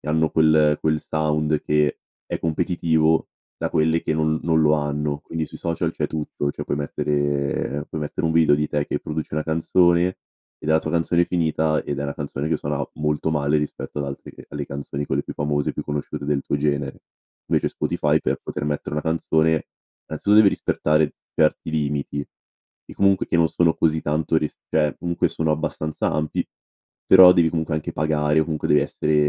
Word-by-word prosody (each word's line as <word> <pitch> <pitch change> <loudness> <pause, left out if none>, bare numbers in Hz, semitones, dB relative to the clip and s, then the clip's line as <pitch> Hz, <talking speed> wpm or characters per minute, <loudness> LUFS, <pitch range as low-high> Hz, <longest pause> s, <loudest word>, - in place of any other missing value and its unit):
e 75 - -9
hanno 80 +1 +2
quel 80 -1 +4
quel 80 -1 +1
sound 75 -1 0
che, 75 0 +1 0.3
è - - -3
competitivo 80 -1 +1 0.3
da - - -2
quelle 80 +1 +2
che 80 - -1
non 80 0 +1
non 80 -1 +2
lo 75 0 +4
hanno. 75 0 -1
Quindi 80 -1 -4
sui - - -10
social 85 0 -2
c'è 75 - -2
tutto, 75 -2 -3
cioè, - - -6
puoi 70 - -2
mettere 70 0 -1
puoi 80 - -5
mettere 75 - -4
un 80 - +1
video 80 -3 +5
di 75 +1 -1
te 75 0 -1
che - - -2
produci 75 -1 -5
una 75 - 0
canzone, 85 +2 +3 0.5
e - - -15
della 80 0 +4
tua 80 - -4
canzone 85 +1 +2
finita, 80 -3 0
ed 70 -1 -3
è - - -2
una 70 - -3
canzone 70 +1 -4
che 80 - +1
suona 70 0 -3
molto 75 +1 -1
male 75 0 +1
rispetto 75 0 -5
ad 70 - -2
altre 70 - -8
che - - -14
alle 75 -1 -5
canzoni 70 +1 -5
quelle 70 +2 -1
più - - -7
famose, 75 0 -1
più - - -4
conosciute 75 -1 -4
del 75 -2 0
tuo - - -1
genere. 70 -1 -1 0.5
Invece - - +1
Spotify - - 0
per - - -1
poter 75 - -4
mettere 75 0 -3
una 75 - -1
canzone, 80 -1 +1 0.4
innanzitutto, 100 +7 +2
deve 105 -2 +8
rispettare 75 -3 +1 0.2
certi 80 0 +1
limiti, 75 -2 -2 0.7
e - - -11
comunque 100 -1 +2
e - - +1
non 80 -1 +4
sono 85 -2 +2
così 80 -1 +1
tanto 80 +2 0
rist 75 -1 -2
cioè, 75 -2 +1
comunque 85 0 0
sono 80 -1 -1
abbastanza 75 0 -2
ampi; 75 0 -1 0.6
però 95 -1 +9
devi 85 -2 +4
comunque 80 -1 -2
anche 80 - -3
pagare, 75 0 +1
o - - +1
comunque, 75 -2 -3
devi 75 - +5
essere 75 0 -1
75 Hz, 195 wpm, -22 LUFS, 75-80 Hz, 0.7 s, però